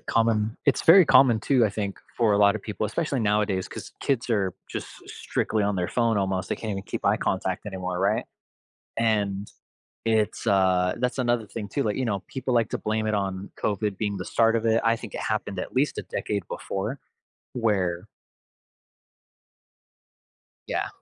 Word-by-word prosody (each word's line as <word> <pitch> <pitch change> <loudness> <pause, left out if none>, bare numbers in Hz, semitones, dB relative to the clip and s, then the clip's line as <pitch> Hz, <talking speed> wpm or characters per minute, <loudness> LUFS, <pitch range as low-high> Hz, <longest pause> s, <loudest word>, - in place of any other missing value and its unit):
common 115 -1 +1
it's 140 - +3
very 180 +3 +8
common 130 -6 +6
too, 125 -1 +3
I 110 - +3
think, 100 -1 -4 0.2
for 115 -3 +3
a 100 - +3
lot 100 0 +5
of 110 - -5
people, 110 0 -3
especially 140 +4 -1
nowadays 105 -3 +1
'cause - - -8
kids 125 -3 0
are 100 -5 +1 0.2
just - - -5 0.2
strictly 110 -2 -1
on 100 -1 0
their 90 -1 -1
phone 115 -2 +1
almost. 95 -1 -1
They - - -1
can't 110 - -5
even 95 -1 -3
keep - - -5
eye - - +4
contact 95 +1 -2
anymore, 90 -2 -4
right? - - +1 0.7
And 105 -3 0 0.5
it's, 110 -2 0
uh 95 -2 +3
that's 125 +1 -1
another 120 -3 +1
thing 105 -2 -6
too, 140 - -1
like, 105 -4 -1
you 130 - 0
know, 100 -5 -1
people 130 -1 -2
like 115 -2 +2
to - - -2
blame 110 0 -1
it 110 - 0
on 95 -1 -2
COVID 105 -1 0
being 105 -2 -1
the 90 - -5
start 115 0 +3
of 115 - -2
it. 115 0 +3
I 115 0 +3
think 115 -2 -10
it - - -3
happened 105 -3 -2
at - - -4
least 140 +3 +1
a - - -2
decade 105 -1 -3
before 110 +8 -4 0.5
where 95 -7 0 2.6
Yeah. - - -1
105 Hz, 185 wpm, -26 LUFS, 100-115 Hz, 2.6 s, very